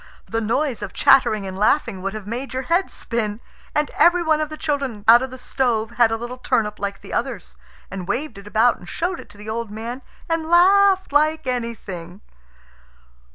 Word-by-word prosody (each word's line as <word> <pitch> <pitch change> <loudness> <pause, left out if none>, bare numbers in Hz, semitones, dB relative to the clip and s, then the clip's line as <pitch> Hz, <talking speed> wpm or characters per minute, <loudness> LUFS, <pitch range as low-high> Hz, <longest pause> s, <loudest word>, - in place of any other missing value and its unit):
The 225 0 -2
noise 245 +3 -1
of 205 - -6
chattering 215 -6 +4
and 190 -1 -6
laughing 205 -1 +1
would 195 +2 -3
have 215 -2 -7
made 250 +5 -5
your 260 - -2
head 345 +7 +1
spin. 220 -3 -3 0.4
And 300 0 +1
every 345 0 +4
one 315 -1 +2
of 305 - -2
the 310 - -7
children 275 -10 -3
out 235 +2 +8
of 260 - -3
the 260 - -9
stove 240 -3 -1
had 240 -1 +4
a 225 - -1
little 240 +2 -7
turnip 210 -4 0
like 200 -1 -4
the - - -10
others, 235 -5 -3 0.4
and 185 -2 -6
waved 245 -3 -3
it 200 - -13
about 225 +3 +3
and 175 - -12
showed 350 +1 -2
it - - -12
to 205 - -15
the 210 +1 -11
old 225 0 -3
man, 230 +5 -6 0.3
and 330 -1 -1
laughed 380 0 +5
like 310 +1 +2
anything. 210 -7 -5
240 Hz, 200 wpm, -22 LUFS, 210-300 Hz, 0.4 s, out